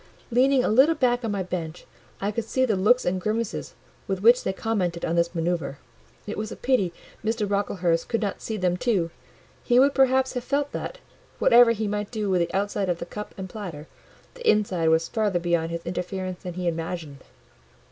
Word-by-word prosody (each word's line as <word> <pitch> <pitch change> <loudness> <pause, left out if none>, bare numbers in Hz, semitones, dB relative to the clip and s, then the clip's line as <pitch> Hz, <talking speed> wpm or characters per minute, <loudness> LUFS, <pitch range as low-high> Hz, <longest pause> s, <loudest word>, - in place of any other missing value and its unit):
Leaning 260 +2 +4
a - - +1
little 270 +9 +5
back 245 -3 +1
on 225 - -1
my 200 -2 -1
bench, 175 -2 -5 0.3
I 200 +1 -1
could 220 +1 -3
see 260 +3 +1
the 220 -5 +1
looks 225 +7 +3
and 185 +1 0
grimaces 220 +2 -2 0.3
with 195 0 -2
which 240 +2 +6
they - - 0
commented 190 -4 -2
on 165 - -1
this 170 +1 +1
manoeuvre: 165 -4 -1 0.5
it 210 - -5
was 215 0 -4
a - - -5
pity 245 -9 +1 0.3
Mr. 220 -1 0
Brocklehurst 185 -4 0
could 230 - +1
not 200 - -3
see 220 - -4
them 180 -2 +1
too; 190 -8 0 0.5
he 245 - +3
would 275 +2 +5
perhaps 265 -1 +3
have 250 -2 -3
felt 285 +2 -1
that, - - -5 0.4
whatever 240 0 +6
he 220 -2 0
might 205 0 -2
do 210 -4 -2
with 180 -2 +3
the 170 - -1
outside 200 0 -1
of 175 - 0
the 170 - -6
cup 210 +4 -8
and 190 -1 -5
platter, 180 -7 -7 0.5
the 485 -2 -1
inside 185 -6 +2
was 160 +1 +3
further 210 -5 0
beyond 170 -1 0
his 170 0 -5
interference 185 +1 -4
than 180 -2 -6
he 180 -1 -2
imagined. 165 -4 -4
200 Hz, 200 wpm, -25 LUFS, 175-230 Hz, 0.5 s, which